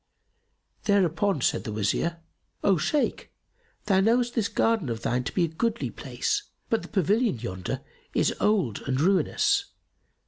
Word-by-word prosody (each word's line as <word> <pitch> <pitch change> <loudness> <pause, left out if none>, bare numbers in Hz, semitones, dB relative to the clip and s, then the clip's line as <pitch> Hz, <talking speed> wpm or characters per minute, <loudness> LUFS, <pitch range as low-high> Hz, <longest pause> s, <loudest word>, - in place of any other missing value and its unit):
Thereupon 195 -4 +2
said - - +1
the 110 - -5
Wazir, 110 +11 -1 0.4
"O 195 -2 +4
Shaykh, 285 - -1 0.5
thou 190 -2 +3
knowest 240 +4 +2
this 225 -3 +1
garden 225 - +1
of 115 0 -4
thine 125 +1 0
to 140 - -2
be 180 - +1
a - - -2
goodly 230 +9 -2
place; 425 -3 -2 0.3
but 225 - +2
the - - -9
pavilion 210 - +1
yonder 95 -5 -4 0.3
is - - +2
old 190 - +1
and 130 -1 0
ruinous. 200 - +2
195 Hz, 145 wpm, -26 LUFS, 140-225 Hz, 0.5 s, O